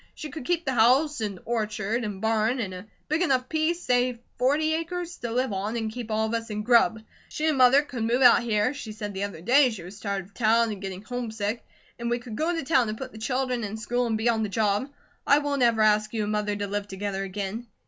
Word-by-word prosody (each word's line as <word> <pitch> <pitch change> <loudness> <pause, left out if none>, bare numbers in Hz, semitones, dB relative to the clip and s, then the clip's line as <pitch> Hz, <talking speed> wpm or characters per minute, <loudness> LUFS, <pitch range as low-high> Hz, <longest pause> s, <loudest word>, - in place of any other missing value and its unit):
She 305 - -7
could 280 -2 -7
keep 345 +1 0
the 265 - 0
house, 255 +4 +3
and 205 -3 -3
orchard, 220 0 -1
and 205 -3 -5
barn, 220 +2 +1
and 200 -5 -3
a 185 +3 -9 0.2
big 310 +3 0
enough 260 -7 +2
piece, 320 +3 0
say 250 0 +1 0.2
forty 295 +5 +2
acres, 345 +2 -4
to 235 - -5
live 250 -1 0
on 205 +4 -2
and 220 -1 -2
keep 235 -1 -6
all 220 0 +1
of 220 - -3
us 230 0 -2
in 210 0 -3
grub. 225 -2 +4 0.3
She 305 - -3
and 310 -2 +2
Mother 255 +3 +6
could 260 -5 -6
move 240 +4 +2
out 245 - +7
here 225 +2 +1
she 245 -7 -7
said 210 -1 -6
the 190 - -4
other 200 -5 -8
day 255 +7 +5
she 215 -7 -7
was 190 +4 -10
tired 200 -3 -3
of 200 - -22
town 230 0 +3
and 200 -2 -7
getting 190 0 -6
homesick 225 -2 -3 0.4
and 235 0 -2
we 240 - +1
could 240 -2 -8
go 320 +8 0
to 330 -3 -2
town 265 -5 +3
to 215 - -3
put 260 +3 -7
the 220 - -11
children 250 +1 -1
in 210 +1 -4
school, 245 +2 -1
and 225 -1 0
be 220 +2 -1
on 230 -2 +2
the 215 - -1
job. 210 +5 0 0.4
I 285 - +6
won't 285 -2 -1
ever 230 -2 +4
ask 215 0 +3
you 215 - 0
and 205 - -2
Mother 210 -1 -1
to 205 0 -3
live 205 0 -3
together 195 0 -3
again. 200 +4 -5
230 Hz, 250 wpm, -26 LUFS, 210-255 Hz, 0.4 s, out